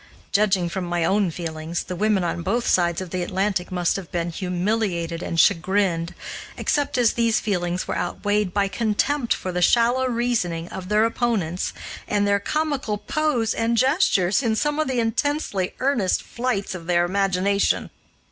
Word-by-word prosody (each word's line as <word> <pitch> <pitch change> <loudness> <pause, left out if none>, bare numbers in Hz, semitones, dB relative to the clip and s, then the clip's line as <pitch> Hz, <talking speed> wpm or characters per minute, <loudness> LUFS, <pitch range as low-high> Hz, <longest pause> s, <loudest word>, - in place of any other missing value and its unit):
Judging 195 -4 +2
from 185 +2 -3
my 175 -1 0
own 195 +1 +2
feelings, 165 0 -4
the 180 - -6
women 205 0 +1
on 175 0 -2
both 230 +8 -1
sides 175 -1 +2
of 185 -3 -7
the 185 - -2
Atlantic 190 0 -1
must 180 0 +1
have 190 -4 -8
been 170 -2 -2
humiliated 180 -2 -1
and 165 - -2
chagrined, 170 0 +2 0.4
except 290 -3 0
as 240 -2 +3
these 230 -1 +2
feelings 180 -3 -2
were - - -2
outweighed 205 +2 -1
by 200 +1 +1
contempt 235 +5 0
for 185 - 0
the 180 0 -2
shallow 240 +7 +3
reasoning 230 -9 -1
of 185 0 -7
their 210 +1 +4
opponents 225 -7 -1 0.4
and 205 -1 +1
their 200 0 +3
comical 285 -3 -1
pose 250 -2 0
and 230 +1 0
gestures 260 - +3
in 230 -4 +1
some 295 +5 0
of 310 - +1
the 260 -2 0
intensely 225 -4 -1
earnest 250 -8 +1
flights 235 -6 -2
of 170 -3 -8
their 175 -1 +3
imagination. 195 +1 +1
200 Hz, 165 wpm, -23 LUFS, 175-230 Hz, 0.4 s, their